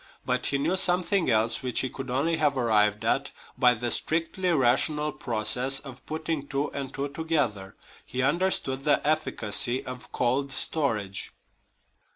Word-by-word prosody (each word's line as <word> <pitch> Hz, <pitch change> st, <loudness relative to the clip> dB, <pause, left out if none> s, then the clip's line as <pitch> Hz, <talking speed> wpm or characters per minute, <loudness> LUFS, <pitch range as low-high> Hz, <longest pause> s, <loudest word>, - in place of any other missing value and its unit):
But 125 Hz, 0 st, 0 dB
he 140 Hz, -, +2 dB
knew 165 Hz, +7 st, +1 dB
something 185 Hz, -1 st, +2 dB
else, 115 Hz, 0 st, +2 dB
which 125 Hz, -3 st, -1 dB
he 130 Hz, -, -2 dB
could 135 Hz, -1 st, -7 dB
only 150 Hz, +6 st, +1 dB
have 150 Hz, -3 st, +2 dB
arrived 105 Hz, -4 st, +2 dB
at -, -, +1 dB, 0.3 s
by 125 Hz, -1 st, +4 dB
the 120 Hz, +1 st, -2 dB
strictly 165 Hz, +6 st, 0 dB
rational 150 Hz, +2 st, +2 dB
process 125 Hz, +3 st, 0 dB
of 135 Hz, -3 st, -11 dB
putting 155 Hz, -2 st, -3 dB
two 140 Hz, +1 st, -2 dB
and 140 Hz, -2 st, -4 dB
two 140 Hz, +1 st, -3 dB
together 140 Hz, -11 st, -2 dB, 0.3 s
he 125 Hz, +1 st, -3 dB
understood 145 Hz, -3 st, 0 dB
the 150 Hz, 0 st, +2 dB
efficacy 125 Hz, -5 st, +1 dB
of 125 Hz, 0 st, -8 dB
cold 135 Hz, +3 st, 0 dB
storage. 110 Hz, -10 st, -1 dB
135 Hz, 150 wpm, -27 LUFS, 120-155 Hz, 0.3 s, by